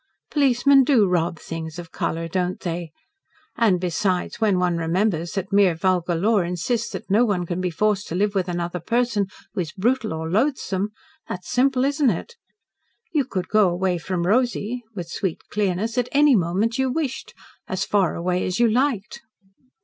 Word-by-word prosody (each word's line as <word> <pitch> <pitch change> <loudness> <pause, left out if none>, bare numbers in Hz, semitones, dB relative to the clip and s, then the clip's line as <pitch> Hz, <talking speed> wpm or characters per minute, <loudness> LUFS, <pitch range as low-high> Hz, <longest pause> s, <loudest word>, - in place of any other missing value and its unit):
Policemen 275 -1 +4
do 245 -7 +4
rob 175 -2 0
things 160 0 -6
of 170 -2 -8
colour, 165 +1 -2
don't 180 +1 -2
they? 170 -2 -4 0.6
And 215 -6 +3
besides, 180 +3 -1
when 205 -4 +3
one 180 -1 +1
remembers 170 +1 0
that 195 0 -4
mere 195 -4 +4
vulgar 175 0 +1
law 210 +6 +2
insists 185 +7 -1
that - - -6
no 215 +4 +5
one 195 -6 0
can 175 +1 -3
be 180 - 0
forced 205 +4 0
to 165 - -4
live 200 +2 +1
with 190 -2 -1
another 175 0 -3
person 230 +1 0 0.3
who - - -1
is 160 -3 -5
brutal 225 +4 0
or 160 0 -3
loathsome, 205 - 0 0.4
that's 180 -1 -6
simple, 260 0 +2
isn't 285 -1 +2
it? 230 - -4 0.8
You 290 -4 +2
could 185 -7 -3
go 210 -3 +4
away 180 0 0
from 175 0 -2
Rosy," 240 +2 0
with 175 -4 -5
sweet 175 0 -3
clearness, 210 +4 0
"at 245 - -1
any 290 -1 +5
moment 200 +6 0
you 265 0 +2
wished 275 -1 -3 0.3
as 190 +1 -2
far 195 -4 +1
away 180 +1 -1
as 185 +4 -2
you 240 - +5
liked." 245 0 0
195 Hz, 175 wpm, -23 LUFS, 175-235 Hz, 0.8 s, no